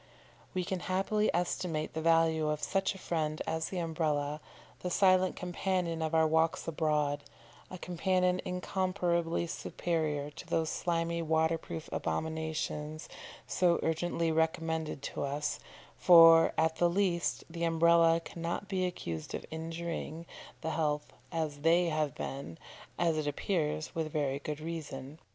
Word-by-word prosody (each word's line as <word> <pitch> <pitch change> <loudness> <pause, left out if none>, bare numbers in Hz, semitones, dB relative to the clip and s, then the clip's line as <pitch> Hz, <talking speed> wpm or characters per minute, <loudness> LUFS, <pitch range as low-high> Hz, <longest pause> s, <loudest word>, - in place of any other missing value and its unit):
We 185 - +1
can 185 +1 -2
happily 195 +4 +1
estimate 170 -2 -1
the 160 - -3
value 165 -1 +3
of 150 0 -2
such 195 0 0
a - - -8
friend 155 -4 -2
as 160 0 -2
the 190 - -4
Umbrella, 155 -3 -1 0.4
the 180 - -3
silent 185 0 +4
companion 180 -2 -1
of 160 0 -1
our 160 0 +5
walks 160 +1 +1
abroad, 150 -3 0 0.5
a 185 - -7
companion 180 +1 +1
incomparably 180 -2 0
superior 155 -4 -2
to - - -11
those 160 -1 0
slimy 170 -1 -1
waterproof 160 0 0
abominations 155 -1 -3 0.4
so 175 -2 +2
urgently 165 0 0
recommended 160 -2 -1
to - - -4
us, 145 +2 -2 0.4
for, 165 -2 +8
at 160 0 +2
the 175 - +4
least, 175 -2 0
the 170 0 -5
Umbrella 165 0 +5
cannot 170 +4 -4
be 185 -2 0
accused 85 - -5
of - - -6
injuring, 165 0 -5 0.4
the 160 - -2
health 150 -2 -1 0.2
as 155 -3 -2
they 170 +3 +4
have 155 -3 -1
been, 135 -12 -6 0.4
as 165 -2 +2
it 150 - -2
appears, 155 0 -1
with 160 -2 -2
very 140 -2 -1
good 150 +1 -5
reason. 155 -3 -6
165 Hz, 135 wpm, -31 LUFS, 155-175 Hz, 0.5 s, for